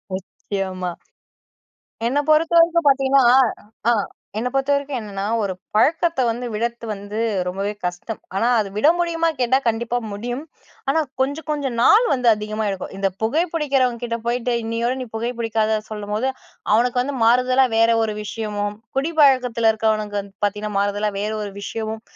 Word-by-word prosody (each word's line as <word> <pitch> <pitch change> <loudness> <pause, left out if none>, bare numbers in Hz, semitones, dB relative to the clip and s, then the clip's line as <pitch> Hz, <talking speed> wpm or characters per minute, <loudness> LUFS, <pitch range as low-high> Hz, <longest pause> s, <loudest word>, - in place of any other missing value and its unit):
நிச்சயமா. 190 -1 -4 1.2
என்ன 260 +5 +1
பொறுத்தவரைக்கும் 330 +1 +4
பார்த்தீங்கன்னா, 270 -1 +3 0.7
ஆ - - +5 0.5
என்ன 245 +3 -1
பொறுத்தவரைக்கும் 280 0 0
என்னன்னா, 200 -2 -5 0.2
ஒரு 200 -2 -1 0.2
பழக்கத்தை 325 +5 +2
வந்து 245 +2 -4
விடர்த்து 235 +1 -3
வந்து 205 +1 -6 0.3
ரொம்பவே 195 +3 -2
கஷ்டம். 180 +5 -4 0.2
ஆனா 230 +4 +2
அத 210 - 0
விட 250 +8 +4
முடியுமா? 335 -1 +1
கேட்டா 255 +1 +3
கண்டிப்பா 235 +2 0
முடியும், 240 +6 -4 0.5
ஆனால் 310 +2 +2
கொஞ்சம் 285 +5 -1
கொஞ்சம் 280 -5 -2
நாள் 420 - +6
வந்து 250 -3 +2
அதிகமா 215 +1 -4
எடுக்கும். 190 -1 -5
இந்த 195 0 +1
புகை 280 +10 +2
பிடிக்கிறவங்க 270 -7 +1
கிட்ட 230 -1 -2
போயிட்டு, 245 +1 0
இன்னையோட 230 +2 -1
நீ - - -6
புகை 230 +2 -1
பிடிக்காத 220 -1 +1
சொல்லும்போது, 210 +3 -2 0.5
அவனுக்கு 245 +2 +2
வந்து 280 +2 -4
மாறுதலா 255 +3 +4
வேறு 230 +1 +5
ஒரு 215 -1 -1
விஷயமும், 210 -1 -3 0.2
குடிப்பழக்கத்தில 260 -7 +3
இருக்கிறவனுக்கு 215 -1 0
வந்து 200 0 -12
பார்த்தீங்கன்னா 210 0 -2
மாறுதலா 205 +1 0
வேறு 215 +1 -2
ஒரு 205 -1 -5
விஷயமும், 220 +1 -4
230 Hz, 145 wpm, -21 LUFS, 210-270 Hz, 1.2 s, நாள்